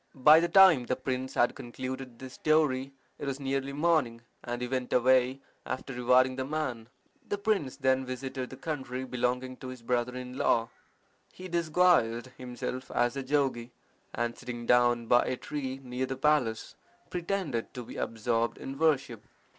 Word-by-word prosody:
By 150 +4 +7
the 170 +1 0
time 170 -9 +7
the 130 - +1
prince 130 0 -4
had 120 - +3
concluded 130 0 -7
this 130 +1 -9
story 145 -4 +1 0.3
it 145 - -5
was 135 0 -3
nearly 135 0 -2
morning, 145 -6 +1 0.2
and 120 0 -4
he 125 - -3
went 130 0 -3
away, 130 +1 +3 0.2
after 130 +1 -5
rewarding 125 +1 +3
the 130 - -1
man. 130 -6 -3 0.4
The 205 - -1
prince 200 -10 -1
then 130 0 +2
visited 130 0 -5
the 130 - -10
country 130 -5 -4
belonging 125 0 -2
to 130 - -9
his 130 -2 -9
brother 125 +1 -1
in 125 0 -7
law. 115 0 +2 0.6
He 185 - -9
disguised 165 -8 +2
himself 125 +1 -5
as 120 +1 +1
a 140 - -2
jogi, 130 -3 -1 0.4
and 120 0 -2
sitting 120 -1 -7
down 120 -1 +3
by 120 +1 +5
a 130 - -2
tree 135 -2 -5
near 125 +1 -3
the 135 - -4
palace, 135 -6 +1 0.4
pretended 175 - -2
to 125 - -5
be - - -10
absorbed 115 +1 -1
in 135 +1 -7
worship. 135 -8 +1
130 Hz, 165 wpm, -29 LUFS, 125-140 Hz, 0.6 s, By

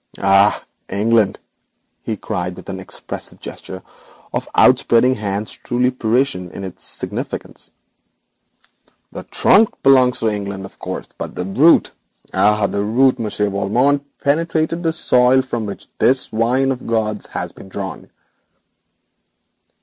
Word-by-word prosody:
'Ah, 100 +1 +3 0.2
England!' 105 0 +2 0.6
he 110 - -4
cried, 90 -3 -4
with - - -11
an 95 -1 -5
expressive 95 - -7
gesture 95 -1 -9 0.5
of - - -3
outspreading 120 +2 +4
hands 105 -2 -3
truly 125 +1 0
Parisian 120 -5 0
in 95 - -8
its 95 -2 -8
significance. - - -4 1.4
'The - - -7
trunk 215 +2 +4
belongs 130 -2 +5
to 115 - 0
England, 100 -2 -3
of - - -14
course, - - -6
but - - -7
the 90 - -3
root 135 - +4 0.4
ah! 105 0 +3
the 100 0 -1
root 125 +5 +3
Monsieur 105 -2 -1
Valmont, 120 +9 +1 0.2
penetrated 160 +2 0
the 165 -2 +1
soil 130 -4 +3
from 120 -4 -4
which 100 - -7
this 130 +1 +2
wine 125 +4 +1
of 130 - -3
the - - -14
gods 110 -2 -1
has - - -5
been 95 - -14
drawn.' 95 0 -6
110 Hz, 135 wpm, -19 LUFS, 100-130 Hz, 1.4 s, belongs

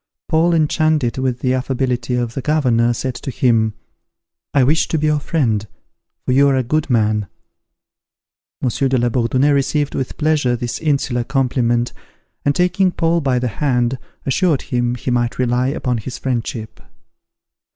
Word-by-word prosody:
Paul, 170 +1 +3
enchanted 155 -5 +1
with 130 -2 -1
the 130 -1 +1
affability 125 -1 -1
of 120 -1 -2
the 135 - -3
governor, 125 -6 +2
said 130 +2 -3
to 125 +3 -7
him, 115 -4 +1 0.8
"I 140 - +3
wish 150 +5 +2
to 160 - -1
be 155 - 0
your 150 -1 +2
friend: 115 -9 0 0.6
for - - 0
you 140 +2 +5
are 135 - +2
a 130 - +1
good 155 +5 -1
man." 105 -4 +1 1.4
Monsieur 130 +2 +1
de 130 - +2
la 120 0 +1
Bourdonnais 130 +4 +2
received 140 +1 +1
with 130 - -4
pleasure 150 -5 +1
this 120 0 -4
insular 135 -5 0
compliment, 120 -2 0 0.5
and, 145 0 +1
taking 180 +1 +2
Paul 170 0 +1
by 135 -3 +1
the 125 0 0
hand, 125 -3 +1 0.3
assured 150 +2 +1
him 120 -1 -1
he 125 +1 -3
might 120 -1 0
rely 125 0 +1
upon 125 -4 -1
his 125 +4 -6
friendship. 120 -3 -4
130 Hz, 160 wpm, -19 LUFS, 120-145 Hz, 1.4 s, you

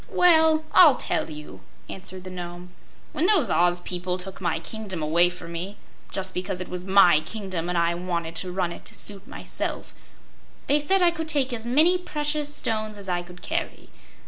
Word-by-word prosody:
"Well, 320 -3 +4
I'll 315 -7 +8
tell - - -1
you," 150 -1 -9 0.3
answered 185 -1 -5
the 185 - -8
Nome. 175 0 -8 0.4
"When 330 - +1
those 365 - +3
Oz 175 0 +3
people 180 0 -3
took 190 +1 -6
my 175 - 0
kingdom 190 -2 -5
away 170 +3 +3
from 175 -1 -9
me 185 +5 -5 0.3
just 190 -1 -3
because 185 0 -3
it 185 - -5
was 180 0 -4
my 190 -4 +6
kingdom 180 0 -5
and 180 - -1
I 170 0 +2
wanted 170 -2 -3
to 180 0 -2
run 180 -1 -1
it - - -9
to - - -5
suit 200 -2 -4
myself - - -5 0.7
they 290 - +3
said 370 +6 +2
I 345 - +5
could 320 -1 -5
take 280 -5 +1
as 230 0 -5
many 320 +9 +4
precious 295 -3 -2
stones 215 -6 -3
as 195 -2 -8
I 175 -1 0
could 180 0 -13
carry. - - -4
190 Hz, 190 wpm, -25 LUFS, 175-280 Hz, 0.7 s, I'll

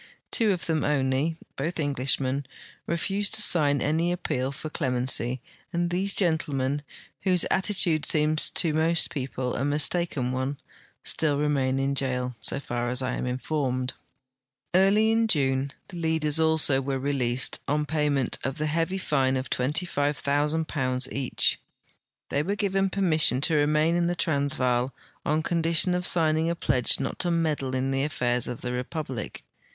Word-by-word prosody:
Tavo 220 -3 +2
of 180 -3 -2
them 160 -3 0
only, 140 +2 0 0.2
both 165 +5 -3
Englishmen, 135 -1 0 0.4
refused 195 +5 0
to - - +1
sign 145 -7 +2
any 165 +4 +1
appeal 135 -6 -2
for 155 +2 -7
clemency, 125 -3 0 0.3
and 175 -1 -1
these 195 +3 0
gentlemen, 145 -6 0 0.4
Avhose 185 -3 +3
attitude 180 -6 +1
seems 155 0 +2
to 160 -3 +2
most 160 +2 +2
jAeople 130 -2 -3
a 135 - -1
mistaken 145 -2 +1
one, 130 +2 -2 0.5
still 150 -3 +2
remain 140 -3 +1
in 135 +1 0
jail, 125 -2 0
so - - 0
far 120 -3 -3
as 125 +1 0
I 130 0 -1
am - - -3
informed. 130 -1 -2 0.8
Early 200 +4 +4
in 225 0 +2
June 135 -6 +2 0.2
the 180 - -8
leaders 160 -2 +1
also 160 -4 +3
Avere 135 0 -2
released, 130 -3 0
on 150 +1 0
payment 145 -3 0
of 135 +1 -3
the 155 - -1
heavy 165 +5 0
fine 135 -7 +1
of 130 -1 -5
£25,000 145 -2 0
each. 135 -2 +1 0.7
They 140 - +1
Avere 200 +7 -2
given 195 -1 +1
permission 160 -9 +2
to 160 +2 +2
re 145 0 +3
main 155 +2 +2
in 175 0 +1
the 175 - 0
Transvaal 135 -6 0 0.3
on 155 +2 0
condition 170 +1 +2
of 180 0 -1
signing 160 -1 +2
a 170 - -1
pledge 130 -7 +2
not 135 - -3
to 175 - 0
meddle 155 -6 0
in 130 +1 -1
the 135 0 0
affairs 125 -4 0
of 125 - -5
the 125 0 -3
republic. 125 -2 -5
150 Hz, 155 wpm, -26 LUFS, 130-165 Hz, 0.8 s, Early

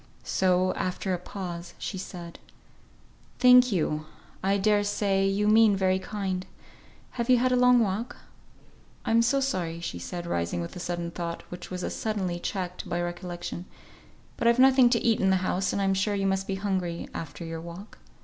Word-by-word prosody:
So, 185 0 +2
after 185 +1 -2
a 180 - -2
pause 175 -2 -7
she 190 - -5
said, 175 -2 -8 1.0
"Thank 250 0 +7
you. 155 -4 -1 0.3
I 195 +1 +2
dare 205 +1 +3
say 200 -1 +1
you 200 +2 +1
mean 215 -1 +6
very 190 -1 +2
kind. 190 -2 -3 0.6
Have 235 0 -3
you 250 - +7
had 255 +1 +2
a - - +4
long 250 0 +5
walk? 220 +4 -2 0.9
I'm 230 +1 +4
so 250 +4 +2
sorry," 180 -12 -2
said 170 - -5
she, - - -8
rising, 85 - -1
with 85 - -5
a - - -6
sudden 175 -1 -3
thought, 170 -1 -5
which 180 0 -8
was 180 -1 -5
as - - -3
suddenly 190 -5 -2
checked 180 0 -4
by 175 -1 -1
recollection, 175 0 -5 0.7
"but 235 - +1
I've 235 +1 +5
nothing 260 -1 +6
to 235 -1 +2
eat 230 -2 +3
in 190 - +3
the 190 - +4
house, 190 +1 0
and - - -1
I'm 195 -1 +2
sure 195 +2 0
you 195 -1 -1
must 195 0 0
be 195 - -1
hungry, 190 -4 -2
after 165 +1 -6
your 165 0 -5
walk." 170 +5 -10
190 Hz, 185 wpm, -27 LUFS, 175-210 Hz, 1.0 s, Thank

